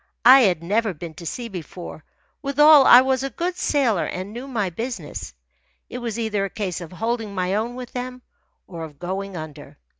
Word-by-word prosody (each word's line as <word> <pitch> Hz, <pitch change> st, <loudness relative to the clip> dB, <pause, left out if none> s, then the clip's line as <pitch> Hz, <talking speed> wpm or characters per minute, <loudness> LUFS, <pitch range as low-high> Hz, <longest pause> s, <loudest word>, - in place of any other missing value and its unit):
I 260 Hz, +3 st, +10 dB
had 180 Hz, -9 st, +2 dB
never 210 Hz, +2 st, 0 dB
been 165 Hz, +1 st, -8 dB
to 170 Hz, +1 st, -9 dB
sea 240 Hz, +6 st, -4 dB
before 175 Hz, -4 st, -8 dB, 0.4 s
withal 295 Hz, 0 st, +6 dB
I 245 Hz, -, +10 dB
was 260 Hz, 0 st, +1 dB
a 275 Hz, -, -2 dB
good 350 Hz, +8 st, -3 dB
sailor 255 Hz, -, +1 dB
and 185 Hz, +3 st, -5 dB
knew 245 Hz, +4 st, -7 dB
my 210 Hz, -8 st, -2 dB
business. 165 Hz, -, -6 dB, 0.6 s
It 250 Hz, -, -5 dB
was 235 Hz, -2 st, -4 dB
either 220 Hz, -3 st, -1 dB
a 195 Hz, -, -2 dB
case 190 Hz, -4 st, -4 dB
of 165 Hz, -, -9 dB
holding 225 Hz, +2 st, -3 dB
my 185 Hz, 0 st, -1 dB
own 225 Hz, +4 st, -1 dB
with 250 Hz, -1 st, -8 dB
them 250 Hz, 0 st, -6 dB, 0.4 s
or 170 Hz, -3 st, -8 dB
of 150 Hz, -3 st, -10 dB
going 190 Hz, +3 st, -5 dB
under. 155 Hz, -2 st, -9 dB
215 Hz, 190 wpm, -23 LUFS, 180-250 Hz, 0.6 s, I